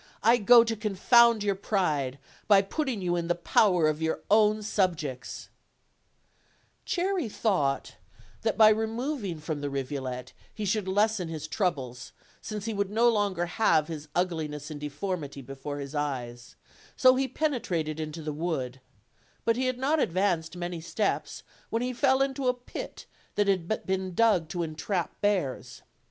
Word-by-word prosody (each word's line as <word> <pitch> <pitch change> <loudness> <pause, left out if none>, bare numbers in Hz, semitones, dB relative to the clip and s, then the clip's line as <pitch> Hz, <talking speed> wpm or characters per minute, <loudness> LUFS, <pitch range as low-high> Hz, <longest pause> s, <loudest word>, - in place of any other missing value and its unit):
I 230 +2 +6
go 235 +2 +7
to 225 -1 -2
confound 220 +2 +4
your 200 -1 +2
pride, 155 -10 -1 0.3
by 200 -2 +6
putting 245 -1 -2
you 175 -1 +1
in 170 -1 -2
the 175 - +1
power 175 -1 +3
of 155 +1 -1
your 160 -1 -1
own 215 0 +4
subjects/' 160 -11 -2 1.4
Cherry 360 - 0
thought 165 -12 0 0.4
that 220 -1 0
by 215 -1 +8
removing 220 - -1
from 150 -1 -4
the 145 - -2
rivulet 130 -2 -4 0.2
he 215 - -3
should 205 0 0
lessen 205 -1 +1
his 160 -2 -5
troubles, 135 - -2 0.3
since 210 -2 -5
he 225 - -2
would 200 -1 -1
no 230 +3 +4
longer 200 -6 +1
have 170 -4 +2
his 155 -2 -6
ugliness 155 -4 -2
and 150 - -6
deformity 150 -2 -4
before 135 +3 -6
his 140 0 -6
eyes; 125 -5 -4 0.4
so 255 -1 +7
he 265 +1 +1
pene 285 +1 -1
trated 155 -3 -2
into 155 +1 -5
the 150 -1 -3
wood: 140 -6 -3 0.6
but 230 - +3
he 255 +1 0
had 255 -1 -1
not 285 +5 +1
advanced 175 - 0
many 175 -1 -4
steps 200 +5 -2 0.3
when 230 +1 -1
he 250 0 -2
fell 265 +1 +3
into 270 -1 -2
a 250 - +3
pit 245 0 -8 0.3
that 205 -1 +2
had 195 +1 0
been 190 -1 -2
dug 205 -8 +3
to 175 -1 -2
entrap 165 +3 -3
bears. 190 -11 -1
185 Hz, 160 wpm, -28 LUFS, 155-220 Hz, 1.4 s, by